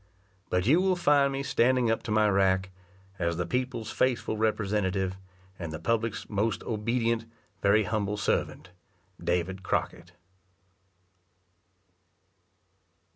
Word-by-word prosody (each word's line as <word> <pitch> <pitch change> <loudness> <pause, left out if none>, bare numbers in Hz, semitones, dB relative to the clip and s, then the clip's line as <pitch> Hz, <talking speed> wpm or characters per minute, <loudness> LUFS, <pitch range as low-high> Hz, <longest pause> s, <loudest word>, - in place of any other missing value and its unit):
But 90 0 +1
you 155 +10 +5
will 190 -1 +2
find 145 -5 +3
me 135 0 -3
standing 125 -2 +2
up 115 - 0
to 110 - -5
my 110 0 +4
rack, 95 -1 +2 0.5
as 85 -1 0
the 90 - -1
people's 125 +2 -2
faithful 125 -3 0
representative, 100 -3 0 0.4
and 85 -3 -5
the 80 - -4
public's 115 +5 -1
most 105 +2 -1
obedient, 115 +1 -1 0.4
very 100 +2 +4
humble 105 +1 -1
servant, 90 - -1 0.5
DAVID 90 +2 -1
CROCKETT. 85 -1 -3
105 Hz, 115 wpm, -28 LUFS, 95-115 Hz, 0.5 s, you